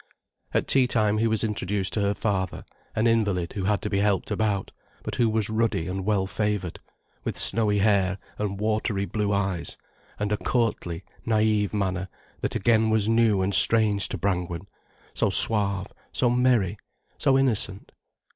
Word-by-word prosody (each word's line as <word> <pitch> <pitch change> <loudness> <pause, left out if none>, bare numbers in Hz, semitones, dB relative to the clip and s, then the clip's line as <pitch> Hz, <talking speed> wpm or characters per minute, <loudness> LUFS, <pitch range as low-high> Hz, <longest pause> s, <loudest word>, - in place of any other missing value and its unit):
At - - 0
tea 130 -2 +3
time 105 -3 +1
he 115 - +2
was 110 0 0
introduced 100 -2 -2
to 105 - -1
her 100 0 0
father, 95 -4 -2 0.3
an 110 - +1
invalid 105 -7 0
who 95 -3 -4
had 105 +1 0
to 105 - -2
be 100 - +1
helped 100 -1 0
about, 105 -3 -1 0.3
but - - -5
who 115 -2 +1
was 110 -1 0
ruddy 110 -6 -1
and 95 +1 -4
well 100 -3 +1
favoured, 105 -3 -3 0.4
with - - -4
snowy 105 -2 +2
hair 100 -2 +2 0.2
and 100 -2 -3
watery 105 -2 -1
blue 105 0 -2
eyes, 95 -4 -2 0.4
and 105 0 -3
a 105 - +1
courtly 100 -9 -2 0.2
naïve 110 -2 +1
manner 95 -3 -2 0.3
that - - -3
again 110 +1 +2
was 110 -1 +1
new 115 -4 +2
and 100 +2 -1
strange 105 -3 +5
to - - -4
Brangwen, 90 -2 -2 0.5
so - - 0
suave, 100 -2 +4 0.2
so 120 -2 +1
merry, 125 -6 +1 0.4
so 135 -1 +3
innocent. 110 -7 0
105 Hz, 165 wpm, -25 LUFS, 95-110 Hz, 0.5 s, strange